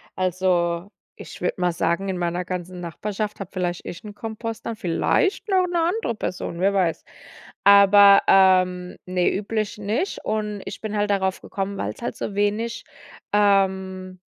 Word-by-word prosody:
Also, 180 0 0 0.2
ich - - -11
würde - - -1
mal 180 0 +2
sagen, 170 +3 -1
in 185 - -2
meiner 175 0 -1
ganzen 180 0 -6
Nachbarschaft 205 +5 -4
habe 195 -3 -6
vielleicht 175 -2 -3
ich 175 - -8
'n 210 -1 -9
Kompost, 225 +1 -6
dann 230 - -3
vielleicht 225 - 0
noch 380 -2 +3
'ne 350 -1 -1
andere 345 - 0
Person, 180 -5 -5
wer 195 +2 +2
weiß. 180 -5 0 0.6
Aber, 200 0 +8
ähm, 185 -1 +4
ne, 180 -1 +1
üblich 215 +1 -2
nicht 215 - -2
und 210 -2 -2
ich - - -7
bin 215 -1 -4
halt 205 0 0
darauf 190 -1 0
gekommen, 195 0 -4
weil - - -3
es - - -18
halt - - -4
so 200 - -5
wenig, 220 +3 -1 0.5
ähm 190 -2 +1
195 Hz, 165 wpm, -23 LUFS, 180-210 Hz, 0.6 s, Aber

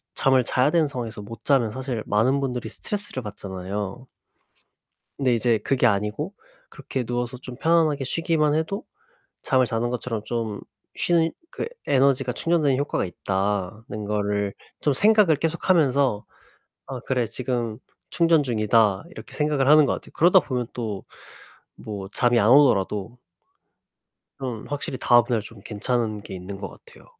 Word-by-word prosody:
잠을 130 -2 +3
자야 125 +4 +2
되는 165 -3 +3
상황에서 120 -6 -6
못 115 +2 -10
자면 125 -6 +2
사실 130 -3 -4
많은 120 +7 +2
분들이 125 -3 -3
스트레스를 205 - -5
받잖아요. 100 +2 -6 1.1
근데 130 -3 +2
이제 115 -1 +2
그게 125 +3 +1
아니고 105 - 0 0.4
그렇게 130 -2 -5
누워서 120 +1 -3
좀 125 -1 -9
편안하게 155 -3 +2
쉬기만 155 0 +1
해도 160 +7 -2 0.6
잠을 130 -2 +3
자는 115 +1 -1
것처럼 120 -3 -3
좀 115 -3 -3 0.3
쉬 165 -2 +2 0.2
그 - - -4 0.2
에너지가 135 -2 +3
충전되는 150 -3 +1
효과가 145 -6 -1
있다는 100 +3 -3
거를 100 -1 -1 0.3
좀 145 - +2
생각을 210 -2 +5
계속하면서 140 - +1 0.6
'아 130 -2 -6
그래 125 0 0
지금 120 -1 -3 0.3
충전 165 -2 +4
중이다.' 110 -2 +2
이렇게 - - -11
생각을 150 -3 +1
하는 150 -1 +7
것 - - +1
같아요. - - -9
그러다 180 +3 +6
보면 125 -5 -3
또 110 -5 -4 0.7
뭐 100 -3 -6
잠이 120 +1 +2
안 105 - +3
오더라도 115 -4 +3 1.2
그럼 125 -5 -5
확실히 140 -2 -3
다음날 120 -1 +4
좀 105 0 -11
괜찮은 110 0 -2
게 100 - -9
있는 95 +2 -7
것 - - -5
같아요. 475 - -17
125 Hz, 320 characters per minute, -24 LUFS, 105-145 Hz, 1.2 s, 하는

